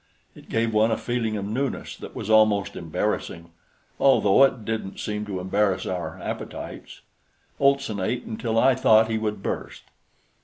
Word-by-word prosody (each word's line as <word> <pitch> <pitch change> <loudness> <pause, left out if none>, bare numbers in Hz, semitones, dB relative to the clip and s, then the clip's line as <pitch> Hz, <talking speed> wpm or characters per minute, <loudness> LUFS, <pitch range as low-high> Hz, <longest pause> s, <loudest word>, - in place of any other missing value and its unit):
It - - -16
gave 115 0 0
one 110 +1 +4
a 110 - 0
feeling 115 -3 -2
of 100 - -4
newness 130 +6 -3
that - - -10
was - - -5
almost 110 -2 +3
embarrassing, 85 0 -3 0.5
although 135 -3 +5
it 125 -5 +2
didn't 110 -3 -4
seem 105 0 -3
to 95 -3 -3
embarrass 95 +1 0
our 90 -2 -4
appetites. - - -7 0.6
Olson 140 -6 +2
ate 110 +6 -1
until 115 0 -3
I 130 +3 +5
thought 110 -3 +4
he 110 - 0
would 105 -2 -3
burst. - - -4
110 Hz, 155 wpm, -24 LUFS, 100-115 Hz, 0.6 s, although